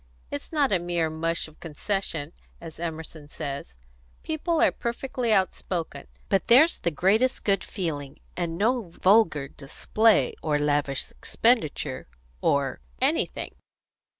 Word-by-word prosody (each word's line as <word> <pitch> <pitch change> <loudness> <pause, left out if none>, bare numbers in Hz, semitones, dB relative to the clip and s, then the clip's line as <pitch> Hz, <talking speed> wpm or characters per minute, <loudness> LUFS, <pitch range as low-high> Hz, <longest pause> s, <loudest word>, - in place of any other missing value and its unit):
It's 145 - -6
not 290 -5 +2
a 190 - +3
mere 170 -2 -1
mush 165 +1 -2
of 155 - -18
concession, 165 -1 -3 0.3
as 165 -2 -10
Emerson 160 -2 -6
says; 140 - -6 0.5
people 320 +1 -1
are - - +5
perfectly 240 0 -2
outspoken; 180 -6 -1 0.2
but 195 -2 +1
there's 285 +8 +6
the 170 - 0
greatest 205 - +2
good 200 -1 +2
feeling, 150 -7 -4 0.2
and 170 -2 -2
no 225 -1 +1
vulgar 175 -6 +3
display, 215 +11 +1
or 150 -2 +1
lavish 145 -2 0
expenditure, 230 - 0 0.3
or 140 - +1 0.2
anything." - - +1
170 Hz, 125 wpm, -26 LUFS, 150-220 Hz, 0.5 s, there's